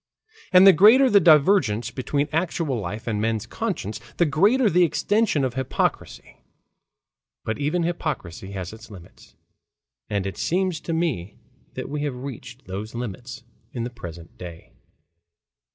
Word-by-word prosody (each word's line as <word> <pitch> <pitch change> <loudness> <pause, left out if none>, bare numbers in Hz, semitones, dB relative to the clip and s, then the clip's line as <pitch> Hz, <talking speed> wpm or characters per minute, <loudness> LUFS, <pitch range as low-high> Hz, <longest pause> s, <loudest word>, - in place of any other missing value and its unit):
And 185 0 +7
the 195 - +9
greater 235 - +6
the 205 - +7
divergence 145 - +4
between 140 +3 -1
actual 160 -5 -1
life 105 +3 -6
and 105 -3 -2
men's 110 -1 -1
conscience, 105 +1 -4 0.2
the 175 - +4
greater 205 - +3
the 180 -2 +3
extension 205 -1 +1
of 130 -2 -1
hypocrisy. 130 0 -3 1.1
But 110 - -3
even 155 +5 0
hypocrisy 145 - -4
has 95 0 -6
its 110 +1 -13
limits. 90 -5 -15 0.7
And 100 -2 -1
it 95 - -5
seems 185 -2 0
to 165 - -4
me 145 - -2 0.4
that - - -5
we 145 +1 -4
have 145 -3 -2
reached 125 0 -9
those 105 +4 -6
limits 125 +2 -6 0.3
in 120 - -3
the 120 - -4
present 85 -8 -11
day. 85 -2 -10
130 Hz, 145 wpm, -23 LUFS, 105-170 Hz, 1.1 s, the